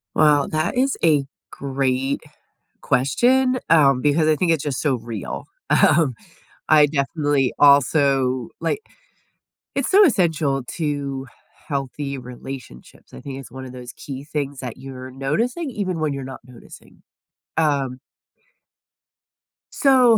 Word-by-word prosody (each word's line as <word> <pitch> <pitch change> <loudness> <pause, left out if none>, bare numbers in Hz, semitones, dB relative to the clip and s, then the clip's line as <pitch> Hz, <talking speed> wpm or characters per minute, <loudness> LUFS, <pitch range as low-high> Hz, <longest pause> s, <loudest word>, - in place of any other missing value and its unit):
Well, 150 -2 +4
that 155 +6 -1
is 270 +1 +2
a 150 -4 +4 0.3
great 135 -1 -1 0.6
question, 255 - +2
um, 140 -5 +5
because 150 +2 +2
I 155 - +4
think 170 +3 +1
it's 160 -4 +1
just 140 -4 -2
so 140 -4 +2
real. 115 -4 -6 0.2
Um, 150 -5 +4 0.5
I 150 -1 +7
definitely 145 -1 0
also, 135 -3 +4
like 430 - -1 0.9
It's 275 - -1
so 405 +2 +7
essential 160 - +2 0.2
to 140 -3 -2
h - - -23 0.3
healthy 140 0 -3
relationships. 125 - -10
I - - -9
think 135 -1 -6
it's 135 - -12
one 130 0 -8
of 125 - -9
those 125 -1 -9
key 135 0 -8
things 145 -2 -4
that 125 -4 -6
you're 130 -1 -9
noticing 230 - -2
even 185 -6 -3
when 155 -2 0
you're 140 -1 -5
not - - -10
noticing. 125 -2 -16 0.6
Um 140 -5 +1 1.7
So 255 -5 +5
140 Hz, 130 wpm, -22 LUFS, 130-160 Hz, 1.7 s, I